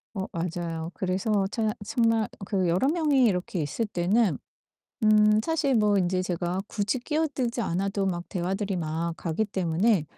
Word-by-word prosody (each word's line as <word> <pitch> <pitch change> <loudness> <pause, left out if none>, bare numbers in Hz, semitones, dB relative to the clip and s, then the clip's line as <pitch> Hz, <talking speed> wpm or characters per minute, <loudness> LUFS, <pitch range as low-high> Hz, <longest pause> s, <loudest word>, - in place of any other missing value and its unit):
어 190 0 -3
맞아요. 170 -1 -3
그래서 195 +2 0
차 220 -3 0
참말 225 0 +1 0.2
그 190 -3 0
여러 180 +11 +2
명이 295 -5 +3
이렇게 180 -4 0
있을 220 +11 -2
때는 195 +3 +1 0.7
음 215 0 +5
사실 315 -3 +1
뭐 210 -2 +3
인제 185 0 +1
제가 180 0 -2
굳이 210 +5 -1
끼어들지 265 -4 -1
않아도 195 +2 -1
막 175 -2 -2
대화들이 195 +1 -2
막 165 +1 -2
가기 175 +6 -1
때문에 190 0 +1
195 Hz, 295 characters per minute, -27 LUFS, 175-225 Hz, 0.7 s, 음